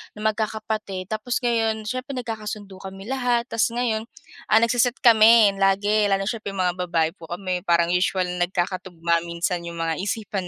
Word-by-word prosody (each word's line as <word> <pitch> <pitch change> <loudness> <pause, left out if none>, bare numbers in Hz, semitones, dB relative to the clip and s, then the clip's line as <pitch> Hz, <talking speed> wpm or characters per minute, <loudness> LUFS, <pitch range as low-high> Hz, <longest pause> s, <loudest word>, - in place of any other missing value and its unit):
na 210 - -9
magkakapatid 215 -3 -2
tapos 215 +3 -1
ngayon 225 -2 0
siyempre 255 +5 -4
nagkakasundo 215 -5 -6
kami 195 +3 -9
lahat. 245 -3 +1
Tapos 230 0 +2
ngayon, 225 -3 -1 0.4
ah, 220 - +5
nagse-set 245 +1 +2
kami 225 -2 +7
lagi 205 +2 +3
lalo 195 0 +1
siyempre 215 -4 -5
mga 180 -1 0
babae 165 -2 +1
po 165 - -12
kami, 180 0 -3
parang 170 0 +3
usual 180 +1 +1
nagkakatugma 175 -1 -1
minsan 170 +1 -2
yung 170 0 -7
mga 165 0 -2
isipan 200 -2 -3
205 Hz, 155 wpm, -23 LUFS, 180-225 Hz, 0.4 s, kami